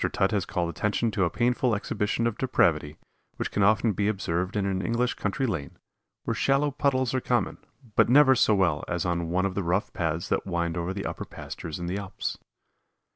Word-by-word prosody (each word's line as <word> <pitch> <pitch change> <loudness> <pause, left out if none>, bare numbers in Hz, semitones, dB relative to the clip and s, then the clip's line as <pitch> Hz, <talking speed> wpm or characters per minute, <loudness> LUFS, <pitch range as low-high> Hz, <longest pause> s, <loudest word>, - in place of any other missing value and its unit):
Tutt 95 - +1
has 100 -4 0
called 85 -1 -1
attention 105 +7 0
to 95 -2 +1
a - - +1
painful 120 +2 +1
exhibition 105 +1 -1
of 115 -2 -1
depravity 80 - +1 0.4
which - - -3
can 105 - 0
often 110 +3 +4
be 100 +2 0
observed 95 -2 -1
in 100 -2 0
an 95 -1 -1
English 120 +3 0
country 105 +6 -2
lane, 80 - -4 0.5
where - - -1
shallow 140 +2 +2
puddles 130 -3 +1
are 130 - 0
common, 120 0 0 0.4
but - - +4
never 135 +1 +7
so 120 -4 +4
well 85 -6 +1
as 85 +1 -2
on 85 -1 -1
one 95 +2 +1
of 95 - -1
the 100 - -1
rough 90 +3 -1
paths 80 0 -2
that - - 0
wind 85 -2 -1
over 85 +1 -2
the 100 +1 -4
upper - - -4
pastures 80 -2 -7
in 85 - -5
the 90 +3 -2
Alps. 100 -2 -5
100 Hz, 205 wpm, -27 LUFS, 85-120 Hz, 0.5 s, never